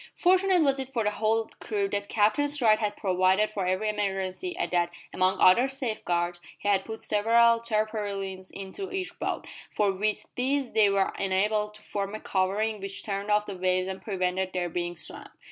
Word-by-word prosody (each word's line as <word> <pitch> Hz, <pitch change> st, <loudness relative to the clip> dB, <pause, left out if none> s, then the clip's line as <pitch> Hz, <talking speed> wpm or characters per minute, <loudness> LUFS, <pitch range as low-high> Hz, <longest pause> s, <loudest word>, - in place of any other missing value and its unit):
Fortunate 370 Hz, -1 st, +4 dB
was 275 Hz, -2 st, +2 dB
it 265 Hz, -1 st, -4 dB
for 235 Hz, -4 st, -1 dB
the 210 Hz, -, +1 dB
whole 220 Hz, +1 st, 0 dB
crew 205 Hz, -3 st, -1 dB
that 200 Hz, 0 st, -3 dB
Captain 220 Hz, +7 st, +2 dB
Stride 235 Hz, -7 st, +3 dB
had 210 Hz, -2 st, -2 dB
provided 190 Hz, +2 st, +2 dB
for 195 Hz, -3 st, -2 dB
every 185 Hz, +4 st, 0 dB
emergency, 205 Hz, -, -2 dB
and 370 Hz, -, -2 dB
that, 175 Hz, -1 st, +1 dB, 0.2 s
among 185 Hz, +1 st, +1 dB
other 235 Hz, +8 st, +6 dB
safeguards, 180 Hz, -10 st, -2 dB, 0.2 s
he -, -, -6 dB
had 195 Hz, -2 st, +2 dB
put 220 Hz, 0 st, -5 dB
several 230 Hz, +2 st, +4 dB
tarpaulins 205 Hz, -4 st, -2 dB
into 195 Hz, -, -7 dB
each 380 Hz, -1 st, -4 dB
boat, -, -, -2 dB, 0.2 s
for 205 Hz, -2 st, +1 dB
with 210 Hz, +3 st, -1 dB
these 265 Hz, +1 st, 0 dB
they 215 Hz, -2 st, +5 dB
were 195 Hz, -1 st, +1 dB
enabled 210 Hz, +2 st, 0 dB
to 215 Hz, -, -14 dB
form 200 Hz, 0 st, -3 dB
a -, -, -5 dB
covering 205 Hz, +3 st, 0 dB
which 195 Hz, 0 st, -6 dB
turned 200 Hz, 0 st, -3 dB
off 210 Hz, 0 st, +3 dB
the 200 Hz, -, -6 dB
waves 185 Hz, 0 st, +1 dB
and 190 Hz, 0 st, -5 dB
prevented 185 Hz, -2 st, -1 dB
their 180 Hz, -1 st, -1 dB
being 175 Hz, +1 st, -3 dB
swamped. -, -, -5 dB
205 Hz, 185 wpm, -27 LUFS, 190-225 Hz, 0.2 s, other